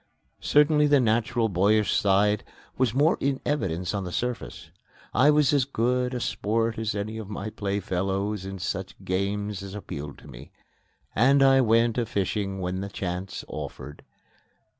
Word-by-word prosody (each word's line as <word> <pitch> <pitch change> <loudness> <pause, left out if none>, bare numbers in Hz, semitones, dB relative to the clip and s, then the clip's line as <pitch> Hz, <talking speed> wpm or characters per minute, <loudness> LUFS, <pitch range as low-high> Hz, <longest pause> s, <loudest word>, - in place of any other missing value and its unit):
Certainly 150 0 +4
the 145 -1 +5
natural, 115 0 +1
boyish 105 +2 +2
side 105 +1 +2 0.3
was 125 -3 +1
more 150 +6 +3
in 135 -1 0
evidence 90 - -1
on 100 -1 -2
the 90 - -5
surface. 90 -9 -4 0.4
I 145 - +5
was 150 -2 +4
as 140 -2 +4
good 125 0 0
a - - -2
sport 115 0 -1
as 110 -2 -2
any 110 +2 -4
of 105 -3 -8
my 105 +1 -5
playfellows 100 0 -2
in 95 0 -6
such 95 +1 -4
games 100 +1 -2
as 100 0 -8
appealed 75 -8 -7
to - - -15
me, - - -11 0.7
and 135 +5 +5
I 135 0 +6
went 115 0 +3
a 115 - -1
fishing 100 0 -2
when 90 +1 -3
the 100 - -5
chance 95 0 -5
offered. 75 - -7
105 Hz, 160 wpm, -26 LUFS, 95-125 Hz, 0.7 s, I